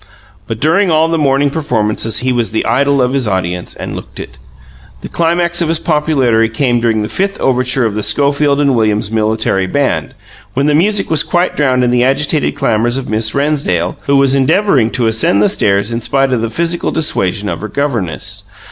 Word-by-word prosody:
But 115 -1 -5
during 170 - +2
all 160 0 +2
the 165 -1 0
morning 140 0 +1
performances 115 -7 -1
he 130 0 0
was 120 -2 0
the 110 - -2
idol 140 +3 +2
of 125 +1 -1
his 135 -4 0
audience 90 -3 -3
and - - -6
looked - - -10
it! - - -10 0.6
The - - -8
climax 170 +1 0
of 170 - +1
his 165 +1 +1
popularity 140 -9 +1
came 120 +1 0
during 115 -2 0
the - - -3
fifth 195 - -2
overture 125 -1 +1
of 110 - -1
the 105 - -3
Schofield 140 +3 +1
and 140 -2 +2
Williams 110 -1 0
Military 110 -3 0
Band, 140 +7 -1 0.4
when 135 +2 +1
the 150 - +2
music 195 +5 +1
was 155 -2 +4
quite 175 +2 -1
drowned 130 -4 +1
in 120 - +1
the 125 0 +2
agitated 145 +3 0
clamours 120 +2 0
of 130 -4 -5
Miss 110 0 0
Rennsdale, 140 - -1
who 140 - +2
was 135 -1 +3
endeavouring 140 - +2
to 125 0 -2
ascend 110 -3 +2
the - - +4
stairs 100 +2 +1
in 115 +1 -3
spite 135 +2 +1
of 120 - 0
the 115 - -2
physical 170 +7 -1
dissuasion 105 - -1
of 85 -2 -4
her 110 - -4
governess. 120 - -3
130 Hz, 200 wpm, -13 LUFS, 110-150 Hz, 0.6 s, was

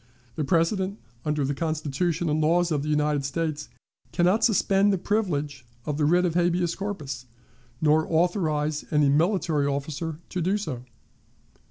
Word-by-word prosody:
The 155 - -1
President, 185 +5 +1 0.3
under 150 -2 0
the 140 - -1
Constitution 160 +2 -1
and 155 +1 +1
laws 170 +2 +2
of 150 -2 +1
the 150 - -4
United 150 -1 +1
States, 150 +1 -3 0.4
can 175 - +2
not 190 +5 +3
suspend 200 -2 +3
the 195 - +1
privilege 150 - -1 0.2
of 150 -2 -2
the 150 - +3
writ 175 +4 +4
of 170 - 0
habeas 175 0 +1
corpus, 155 -11 -5 0.5
nor 155 0 +3
authorize 160 -3 +1
any 150 -2 +3
military 160 -1 +2
officer 145 +3 -3
to 180 - -3
do 190 +5 +1
so. 135 -12 -5
160 Hz, 155 wpm, -26 LUFS, 150-180 Hz, 0.5 s, writ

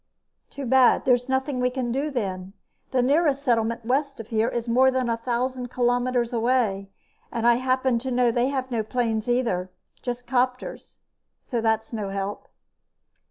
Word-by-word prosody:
"Too 280 - -6
bad. 260 0 +4
There's 250 0 +2
nothing 265 0 0
we 250 0 +2
can 250 -2 -3
do, 275 +5 -1
then. 195 -7 -4 0.4
The 255 -2 +1
nearest 285 +1 +2
settlement 230 -3 0
west 275 +2 0
of 225 - -8
here 225 0 +1
is 235 0 -3
more 255 +3 +4
than 260 -1 0
a 230 - 0
thousand 250 +2 -2
kilometers 245 0 0
away, 225 -5 +1 0.4
and 230 0 -2
I 240 0 +5
happen 255 -1 +1
to 260 +2 -4
know 245 -1 +2
they 240 +2 +1
have 260 -2 -3
no 230 -2 0
planes, 225 0 -1
either. 225 -7 0 0.3
Just 245 0 -4
copters. 255 0 -2 0.5
So 240 -3 -2
that's 220 0 0
no 210 -3 -3
help." 195 +1 -4
245 Hz, 165 wpm, -25 LUFS, 230-260 Hz, 0.5 s, I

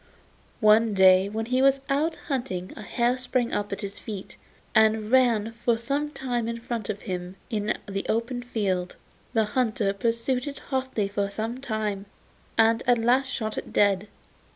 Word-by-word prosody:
One 215 0 +5
day 190 0 +6
when 220 +2 -3
he 255 +2 +1
was 275 0 +4
out 300 +4 +1
hunting 245 - -3
a - - -8
hare 240 +4 0
sprang 250 -1 0
up 205 0 -1
at 200 - -4
his 200 -1 -6
feet, 200 -4 -7 0.4
and 220 0 +3
ran 235 -4 +4
for 235 0 0
some 280 +6 -2
way 245 -2 0
in 230 0 -2
front 230 -3 -4
of 205 -1 -3
him 180 -2 -5 0.2
in 215 -1 0
the 195 -1 -3
open 235 +2 -1
field. 195 -7 -2 0.4
The 220 -2 +3
hunter 215 -3 0
pursued 235 +5 -1
it 280 - -5
hotly 260 -6 -2
for 200 0 -1
some 220 +5 -3
time, 215 -5 -3 0.5
and 225 +1 +4
at 245 -1 +5
last 245 +4 +3
shot 220 -5 -3
it - - -10
dead. 200 0 +3
225 Hz, 170 wpm, -26 LUFS, 205-250 Hz, 0.5 s, day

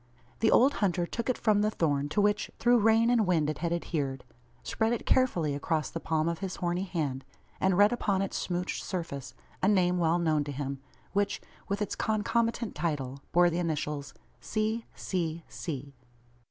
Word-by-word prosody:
The 225 - +4
old 270 +3 +5
hunter 180 -3 +2
took 235 +7 -4
it 255 - +1
from 215 -3 +3
the 210 - +3
thorn 145 -7 0
to 175 - 0
which, 205 +1 +1
through 240 0 +4
rain 225 +2 +4
and 225 -5 +3
wind, 160 -4 +2
it 150 - -7
had 170 +1 -1
adhered; 145 -6 -2 0.4
spread 225 +1 0
it 235 - -3
carefully 175 - +2
across 150 +2 -1
the 165 - -4
palm 160 -1 0
of 170 -1 -1
his 190 -2 -4
horny 175 +1 -1
hand; 145 -8 -2 0.4
and 190 -1 +2
read 205 +3 +6
upon 195 -5 +1
its 195 - -4
smouched 180 0 -2
surface 165 -8 -5 0.3
a - - +3
name 180 -3 +3
well 165 0 +3
known 155 -3 +2
to 145 - -4
him; 140 0 -4 0.3
which, 200 0 +1 0.3
with 200 +1 0
its - - -4
concomitant 230 +1 0
title, 140 -5 -2
bore 175 0 +5
the 170 - -1
initials, 150 -4 -2 0.2
"C.C.C." 170 - -3
175 Hz, 175 wpm, -29 LUFS, 155-210 Hz, 0.4 s, read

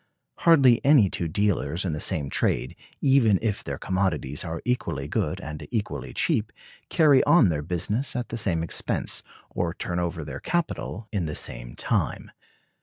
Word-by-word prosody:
Hardly 135 -8 +5
any 135 -9 +5
two 85 - -2
dealers 90 -3 0
in 85 - -1
the 75 - -3
same 70 -3 -1
trade, 65 - 0 0.3
even 130 -7 +4
if 110 -3 -2
their - - -4
commodities 90 -7 -1
are 85 -1 -4
equally 125 0 -1
good - - -1
and 75 +1 -7
equally 105 -3 -3
cheap, - - 0 0.4
carry 150 -5 +5
on 170 - +6
their 75 -3 -1
business 100 - -1
at 125 -1 -3
the 115 - -4
same 85 -7 0
expense, 85 - -2 0.3
or 85 0 -2
turn 90 0 -3
over 85 -3 -3
their 75 - -6
capital 165 -10 -2
in 100 -6 -1
the 75 - -4
same - - -4
time. - - -1
95 Hz, 165 wpm, -25 LUFS, 80-120 Hz, 0.4 s, on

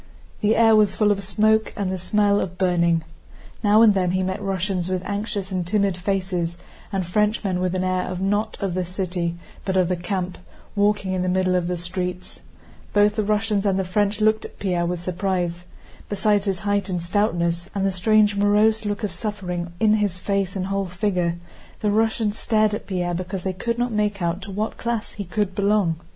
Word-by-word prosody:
The 210 +1 +2
air 225 -1 +6
was 210 -2 +4
full 210 -1 +3
of 200 -1 0
smoke 215 +2 +2
and 195 -3 -1
the 190 - -3
smell 205 +2 +2
of 180 0 -4
burning. 170 -3 +2 0.6
Now 210 +2 +6
and 215 -2 +7
then 185 -2 +1
he 185 +1 +1
met 190 +2 -2
Russians 190 -2 -1
with 185 -1 -1
anxious 200 -1 -3
and 185 -1 -1
timid 195 +1 +1
faces, 180 -2 -2 0.3
and 195 -2 -1
Frenchmen 205 0 0
with 185 0 0
an 185 - 0
air 185 0 -1
not 205 +3 0
of 195 -3 -1
the 185 +1 0
city 180 -1 -2 0.3
but 190 -1 0
of 180 -2 +3
the 180 - +1
camp, 180 +1 -3 0.4
walking 205 -2 +1
in 185 - 0
the 185 - 0
middle 185 0 +2
of 180 -1 +1
the 180 0 -1
streets. 180 +1 -4 0.5
Both 205 0 +4
the 215 - +1
Russians 210 -1 +1
and 195 -2 +1
the 190 - +1
French 205 +3 0
looked 215 0 +3
at - - -10
Pierre 175 -3 0
with 175 -1 -3
surprise. 175 -1 -2 0.4
Besides 205 0 +1
his 195 -3 -1
height 205 -1 0
and 180 -1 -1
stoutness, 175 -2 0
and 195 -1 0
the 195 - +2
strange 210 +2 +3
morose 210 +2 +3
look 205 +2 -2
of 205 - -1
suffering 180 -2 -4
in 215 -1 +4
his 205 -4 0
face 195 0 -1
and 185 -1 -2
whole 195 0 -1
figure, 180 -2 0 0.5
the 210 - +1
Russians 220 0 +1
stared 215 -2 +2
at 210 - -5
Pierre 180 -2 -1
because 185 +1 -4
they 190 - -1
could 235 +5 -2
not 245 0 0
make 210 -1 0
out 175 +1 -1
to 195 - -8
what 210 +3 -3
class 235 -2 -2
he 200 - -6
could 200 +1 -1
belong. 200 -4 +2
195 Hz, 200 wpm, -23 LUFS, 180-210 Hz, 0.6 s, and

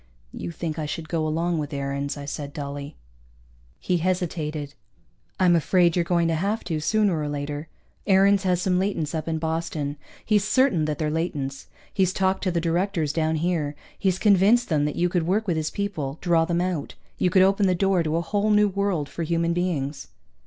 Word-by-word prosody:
"You - - -5
think 165 -1 -4
I 155 - -2
should 160 +1 -5
go 160 -2 0
along 165 +2 0
with 150 0 -4
Aarons," 140 +1 -3
I 140 - -7
said 145 0 -5
dully. 140 -1 -6 0.8
He 180 - 0
hesitated. 160 -5 -2 0.7
"I'm 180 -2 +5
afraid 170 +1 +3
you're 175 - +2
going 170 -1 +1
to - - +1
have 200 +7 -1
to, 160 -3 -2
sooner 200 0 +2
or 150 -1 -2
later. 145 +1 -4 0.4
Aarons 195 0 +5
has 180 -2 +1
some 180 -1 +2
latents 185 -6 -1
up 160 0 -3
in 160 -1 -1
Boston. 160 -2 -2 0.3
He's 210 -2 +3
certain 230 - +2
that 150 -1 -2
they're 150 -1 -1
latents. 145 -4 -3 0.3
He's 185 -2 +2
talked 190 0 +1
to 185 - +2
the 170 - 0
directors 170 -2 0
down 160 0 +1
here. 155 -3 -1 0.2
He's 190 -2 0
convinced 210 +4 +4
them 150 -3 +2
that 150 - -2
you 175 - +2
could 175 -2 -1
work 210 +5 +1
with 175 - +1
his 155 -1 -1
people, 160 -9 -3
draw 170 -3 +2
them 170 +1 0
out. 180 -5 -3 0.2
You 180 - +3
could 185 +1 +5
open 195 +1 +3
the 185 - +2
door 190 0 +2
to 160 -1 -1
a - - +1
whole 205 +4 0
new 210 0 +4
world 195 -6 -1
for 170 - -7
human 170 +1 0
beings." 155 -6 -2
170 Hz, 200 wpm, -24 LUFS, 155-190 Hz, 0.8 s, I'm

